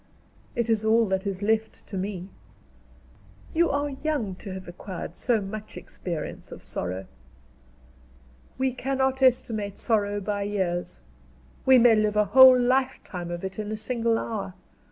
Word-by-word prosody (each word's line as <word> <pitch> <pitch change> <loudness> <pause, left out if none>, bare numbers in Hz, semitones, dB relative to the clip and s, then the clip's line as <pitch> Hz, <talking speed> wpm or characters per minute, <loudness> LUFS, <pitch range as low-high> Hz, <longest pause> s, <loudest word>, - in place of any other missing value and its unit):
"It 235 -1 0
is 220 -2 +1
all 225 +1 +4
that 190 +1 -1
is 195 0 -3
left 220 +1 0
to - - -8
me." 190 -1 -4 1.2
"You 340 +1 +3
are 285 +1 -1
young 270 -7 -2
to 195 - -8
have 185 -1 -7
acquired 180 +1 -7
so 240 -3 +1
much 210 +2 -7
experience 170 -4 -6
of - - -10
sorrow." 95 +2 -4 1.5
"We 260 0 0
cannot 265 +1 -1
estimate 220 -6 +2
sorrow 205 -3 0
by 205 +1 -2
years. 180 - -2 0.7
We 260 -1 +8
may 235 -2 +6
live 215 -1 +1
a 210 0 +4
whole 255 +4 +8
lifetime 250 -8 0
of 175 +1 -5
it 190 +2 -5
in 210 0 -4
a - - -1
single 230 +1 0
hour. 205 -6 -4
215 Hz, 150 wpm, -26 LUFS, 190-250 Hz, 1.5 s, We